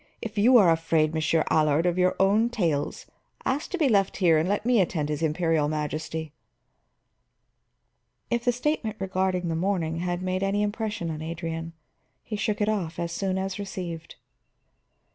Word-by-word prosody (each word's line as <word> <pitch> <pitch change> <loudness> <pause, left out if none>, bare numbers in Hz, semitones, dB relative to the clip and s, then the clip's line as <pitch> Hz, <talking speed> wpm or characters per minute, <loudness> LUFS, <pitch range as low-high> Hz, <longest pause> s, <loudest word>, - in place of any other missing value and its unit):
"If 220 -3 -6
you 240 +5 +6
are 190 -7 +6
afraid, 160 -1 +1
Monsieur 160 0 +1
Allard, 155 +1 +3
of 175 -1 +2
your 180 0 +3
own 210 +4 +3
tales, 170 -11 -1 0.4
ask 275 +4 -1
to 370 - -3
be 310 -5 +3
left 200 -5 +2
here 170 -5 +4
and 165 +4 0
let 205 +2 -1
me 240 -4 +4
attend 160 -5 -1
his 150 0 -2
Imperial 160 -1 +1
Majesty." 155 0 -4 2.0
If 235 0 0
the 245 - +3
statement 245 -3 -1
regarding 185 -2 -1
the 165 - -1
morning 165 -2 -1
had 175 +1 -2
made 185 0 -1
any 200 +1 +1
impression 210 -4 -2
on 155 0 -5
Adrian, 165 0 -5 0.5
he 215 - -5
shook 210 0 -1
it 210 - +2
off 195 -7 -1
as 170 0 -3
soon 190 +2 -1
as 190 0 -3
received. 180 -5 -6
180 Hz, 165 wpm, -26 LUFS, 160-205 Hz, 2.0 s, you